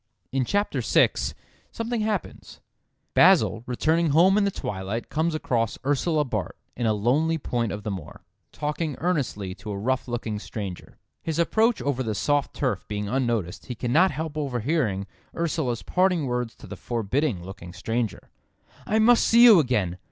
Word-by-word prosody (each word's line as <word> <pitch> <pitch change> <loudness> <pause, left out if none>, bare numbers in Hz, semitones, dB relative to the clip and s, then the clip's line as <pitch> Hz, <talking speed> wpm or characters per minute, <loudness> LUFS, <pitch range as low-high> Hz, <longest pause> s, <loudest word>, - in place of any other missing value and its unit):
In 135 -1 0
chapter 205 - 0
six - - +2 0.4
something 230 0 -2
happens: 210 -3 -4 0.5
"Basil, 115 - +5
returning 160 +6 +1
home 175 +6 +5
in 210 -1 +3
the - - +2
twilight, 105 - -4
comes 160 +1 0
across 115 -7 -1
Ursula 150 +2 +1
Bart, 105 -9 -4 0.2
in 120 -2 -1
a 110 - +3
lonely 145 +10 +1
point 120 -7 -2
of 105 +1 -5
the 105 - -3
moor, 90 -6 -8 0.3
talking 150 0 -3
earnestly 135 - -1
to 105 +2 -10
a 100 - -3
rough 130 +5 -1
looking 115 -3 -3
stranger. 100 -4 -7 0.2
His 160 -1 -3
approach 220 +7 +2
over 135 -2 -1
the 110 -4 -2
soft 145 +5 0
turf 125 -9 -1
being 105 -1 -3
unnoticed, 115 -7 -1
he 125 - -4
cannot 130 +11 +3
help 155 -2 -5
overhearing 125 - -1 0.3
Ursula's 155 -8 -1
parting 180 -4 +2
words 125 -2 -2
to - - -14
the 105 - -8
forbidding 115 - -1
looking 95 -2 -9
stranger: 115 +5 -3 0.6
'I 215 - +2
must 230 +2 +5
see 235 +1 +6
you 225 -7 +9
again! 105 - 0
130 Hz, 160 wpm, -25 LUFS, 105-160 Hz, 0.6 s, you